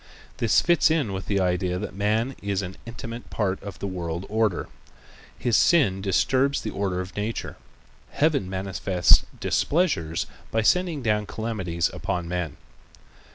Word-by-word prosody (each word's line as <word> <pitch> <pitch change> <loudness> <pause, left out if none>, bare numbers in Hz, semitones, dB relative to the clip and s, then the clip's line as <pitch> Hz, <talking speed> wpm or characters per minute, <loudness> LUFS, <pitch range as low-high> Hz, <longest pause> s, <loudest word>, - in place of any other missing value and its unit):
This 115 - +4
fits 170 -1 +4
in 150 -11 +1
with 95 0 -5
the 100 -1 +1
idea 90 -1 +1
that 105 - -5
man 110 +6 0
is 100 -1 -1
an 95 0 -6
intimate 115 0 -7
part 95 -3 -1
of 100 -2 -8
the - - -5
world 85 -2 -4
order. 110 -4 +1 0.7
His 120 -3 +1
sin 130 - +4
disturbs 130 +8 +2
the - - -4
order 95 -2 -1
of 90 0 -8
nature. 105 +2 -3 0.5
Heaven 145 -11 +1
manifests 95 -1 +3 0.2
displeasures 140 - +1 0.2
by 110 0 +1
sending 170 +2 +2
down 105 -2 +1
calamities 95 -8 -2
upon 90 -1 -3
men. 85 -4 -3
100 Hz, 145 wpm, -25 LUFS, 90-115 Hz, 0.7 s, This